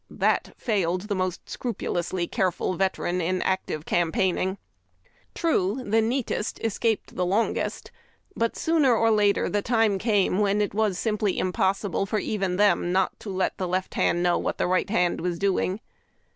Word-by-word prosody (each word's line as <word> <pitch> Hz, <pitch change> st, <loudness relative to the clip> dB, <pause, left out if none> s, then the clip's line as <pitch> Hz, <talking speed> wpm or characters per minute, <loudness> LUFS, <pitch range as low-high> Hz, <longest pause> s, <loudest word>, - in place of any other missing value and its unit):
That -, -, 0 dB
failed 185 Hz, -6 st, 0 dB
the 210 Hz, +1 st, -3 dB
most 185 Hz, -2 st, -3 dB
scrupulously 180 Hz, -7 st, -3 dB
careful 185 Hz, 0 st, -1 dB
vet 190 Hz, +1 st, 0 dB
eran 180 Hz, +1 st, -1 dB
in 185 Hz, +2 st, 0 dB
active 185 Hz, -5 st, -2 dB
campaigning. 185 Hz, +2 st, 0 dB, 0.8 s
True, 255 Hz, -, 0 dB
the 220 Hz, +2 st, +3 dB
neatest 230 Hz, -1 st, -2 dB
escaped 225 Hz, 0 st, -1 dB
the 180 Hz, -, 0 dB
longest, 200 Hz, +6 st, -1 dB, 0.4 s
but 230 Hz, 0 st, -1 dB
sooner 310 Hz, -7 st, +3 dB
or 225 Hz, 0 st, +3 dB
later 205 Hz, -2 st, +3 dB
the 205 Hz, -, 0 dB
time 225 Hz, -3 st, +2 dB
came 205 Hz, -3 st, +2 dB
when 205 Hz, 0 st, +2 dB
it 205 Hz, -2 st, 0 dB
was 210 Hz, -3 st, +1 dB
simply 210 Hz, -3 st, 0 dB
impossible 195 Hz, +1 st, 0 dB
for 215 Hz, -, -2 dB
PEDicuns -, -, 0 dB
vEs -, -, -4 dB
even 195 Hz, -3 st, -1 dB
them 195 Hz, -4 st, +3 dB
not 190 Hz, 0 st, 0 dB
to 210 Hz, -, -8 dB
let 190 Hz, -1 st, -1 dB
the 185 Hz, -, -1 dB
left 185 Hz, +1 st, -2 dB
hand 175 Hz, +1 st, +1 dB
knotv 175 Hz, -, +2 dB
what -, -, -2 dB
the -, -, 0 dB
right 185 Hz, +1 st, +1 dB
hand 180 Hz, -6 st, +1 dB
was 175 Hz, 0 st, -2 dB
doing. 195 Hz, +1 st, 0 dB
195 Hz, 170 wpm, -25 LUFS, 185-215 Hz, 0.8 s, the